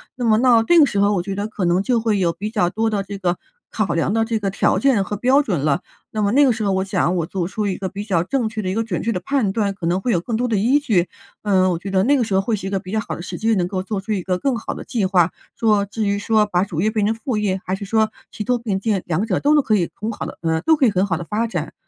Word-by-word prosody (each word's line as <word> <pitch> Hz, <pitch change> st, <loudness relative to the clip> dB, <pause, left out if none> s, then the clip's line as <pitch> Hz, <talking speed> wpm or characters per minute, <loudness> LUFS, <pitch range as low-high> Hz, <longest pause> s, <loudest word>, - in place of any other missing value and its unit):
那 245 Hz, -, -3 dB
么 220 Hz, -1 st, +4 dB
到 240 Hz, -3 st, +5 dB
这 345 Hz, +9 st, +4 dB
个 305 Hz, -, +8 dB
时 205 Hz, -, -1 dB
候 200 Hz, +1 st, +3 dB
我 180 Hz, -, 0 dB
觉 195 Hz, +1 st, -4 dB
得 200 Hz, +2 st, -3 dB
可 215 Hz, -3 st, -5 dB
能 175 Hz, +1 st, +2 dB
就 240 Hz, +3 st, +1 dB
会 220 Hz, -3 st, +1 dB
有 170 Hz, -3 st, +1 dB
比 210 Hz, +5 st, -5 dB
较 205 Hz, -6 st, +1 dB
多 225 Hz, +4 st, 0 dB
的 205 Hz, -2 st, -1 dB
这 200 Hz, +1 st, -7 dB
个 180 Hz, -2 st, -1 dB, 0.3 s
考 215 Hz, -2 st, -1 dB
量 170 Hz, +3 st, 0 dB
的 225 Hz, 0 st, +2 dB
这 225 Hz, -1 st, -1 dB
个 200 Hz, -2 st, -1 dB
条 190 Hz, -, +1 dB
件 260 Hz, -7 st, +3 dB
和 205 Hz, -, -4 dB
标 255 Hz, +7 st, +3 dB
准 190 Hz, -, -1 dB
了， 140 Hz, -1 st, +1 dB, 0.3 s
那 215 Hz, -, -2 dB
么 200 Hz, -, +2 dB
那 280 Hz, +5 st, +5 dB
个 260 Hz, -, +4 dB
时 225 Hz, -1 st, -2 dB
候 200 Hz, -, +1 dB
我 190 Hz, 0 st, +1 dB
想 185 Hz, -2 st, 0 dB
我 165 Hz, -, 0 dB
做 180 Hz, -2 st, -2 dB
出 210 Hz, +2 st, -2 dB
一 190 Hz, -, -2 dB
个 190 Hz, -, -3 dB
比 200 Hz, +2 st, -6 dB
较 185 Hz, -6 st, +1 dB
正 230 Hz, +4 st, -1 dB
确 220 Hz, 0 st, -4 dB
的 185 Hz, -, -2 dB
一 -, -, -1 dB
个 225 Hz, +3 st, 0 dB
准 210 Hz, -6 st, -3 dB
确 230 Hz, -, 0 dB
的 185 Hz, -, -2 dB
判 255 Hz, -3 st, 0 dB
断， 200 Hz, -1 st, 0 dB
可 180 Hz, -, -6 dB
能 175 Hz, +3 st, +1 dB
会 245 Hz, -, 0 dB
有 180 Hz, -, +2 dB
更 225 Hz, +7 st, -3 dB
多 245 Hz, +3 st, 0 dB
的 230 Hz, -, 0 dB
依 245 Hz, +9 st, +3 dB
据， 210 Hz, -12 st, +1 dB, 0.4 s
嗯， 190 Hz, -3 st, +3 dB
我 170 Hz, -, -1 dB
觉 195 Hz, +3 st, -6 dB
得 190 Hz, -1 st, +3 dB
那 280 Hz, +6 st, +3 dB
个 250 Hz, -, +2 dB
时 215 Hz, -3 st, -3 dB
候 190 Hz, -, +3 dB
会 220 Hz, +3 st, -1 dB
是 190 Hz, -, -7 dB
一 -, -, -2 dB
个 195 Hz, -, 0 dB
比 185 Hz, -1 st, -10 dB
较 220 Hz, -, 0 dB
好 215 Hz, -, -4 dB
的 -, -, -8 dB
时 175 Hz, -, -6 dB
机， 225 Hz, +1 st, +1 dB
能 180 Hz, -3 st, 0 dB
够 185 Hz, 0 st, -3 dB
做 195 Hz, 0 st, -3 dB
出 200 Hz, -, -6 dB
一 200 Hz, -3 st, 0 dB
个 180 Hz, 0 st, -1 dB
更 270 Hz, +3 st, 0 dB
好 225 Hz, -, -5 dB
的 -, -, -8 dB
计 230 Hz, -7 st, -1 dB
划。 185 Hz, -3 st, +3 dB, 0.2 s
说 210 Hz, -3 st, +2 dB
至 215 Hz, +2 st, -3 dB
于 200 Hz, 0 st, +1 dB
说 215 Hz, +1 st, +2 dB
把 180 Hz, -2 st, +1 dB
主 170 Hz, -5 st, -3 dB
业 215 Hz, -, +2 dB
变 215 Hz, -2 st, 0 dB
成 215 Hz, -, +2 dB
副 225 Hz, +1 st, -3 dB
业， 195 Hz, -3 st, 0 dB
还 185 Hz, -, -1 dB
是 200 Hz, -, -7 dB
说 220 Hz, +1 st, +1 dB, 0.2 s
齐 215 Hz, -, -5 dB
头 250 Hz, +2 st, +1 dB
并 215 Hz, -5 st, -2 dB
进， 200 Hz, -1 st, 0 dB
两 175 Hz, +5 st, 0 dB
者 185 Hz, -5 st, 0 dB
都 295 Hz, +2 st, +3 dB
能 300 Hz, -, +5 dB
可 215 Hz, -, +2 dB
以 175 Hz, -5 st, 0 dB
很 215 Hz, +2 st, -4 dB
好 215 Hz, -, -5 dB
地 -, -, -8 dB
呃， 160 Hz, -1 st, 0 dB
都 320 Hz, -, +4 dB
可 290 Hz, -3 st, +2 dB
以 -, -, +2 dB
很 190 Hz, 0 st, +1 dB
好 185 Hz, -5 st, -1 dB
地 175 Hz, -, -5 dB
发 215 Hz, +6 st, -1 dB
展， 225 Hz, -, -4 dB
205 Hz, 360 characters per minute, -20 LUFS, 190-225 Hz, 0.4 s, 个